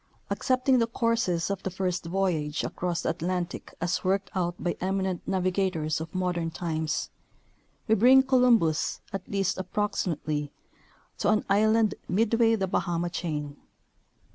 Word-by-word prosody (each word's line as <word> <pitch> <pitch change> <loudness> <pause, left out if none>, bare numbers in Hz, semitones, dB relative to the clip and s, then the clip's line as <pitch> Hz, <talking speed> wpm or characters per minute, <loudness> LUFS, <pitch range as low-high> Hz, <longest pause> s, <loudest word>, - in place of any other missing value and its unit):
Accepting 255 0 +2
the 230 - +2
courses 230 -7 0
of 195 - -3
the - - -3
first 185 -2 -2
voyage 165 -5 0
across 175 -1 -2
the - - 0
Atlantic 175 +1 -4
as 175 +1 -1
worked 195 +1 0
out 175 -2 -1
by 175 - -1
eminent 190 -1 -1
navigators 185 -4 0
of 160 +3 -8
modern 175 -2 -1
times, 160 -2 -2 0.8
we 220 - +4
bring 255 +5 +6
Columbus, 245 - +3
at 195 -1 -5
least 195 -1 0
approximately, 165 -7 -2 0.7
to - - +1
an 215 0 +2
island 215 +1 +4 0.2
midway 225 +3 +3
the 195 -3 0
Bahama 175 -2 -1
chain. 150 -5 -4
185 Hz, 135 wpm, -27 LUFS, 170-210 Hz, 0.8 s, bring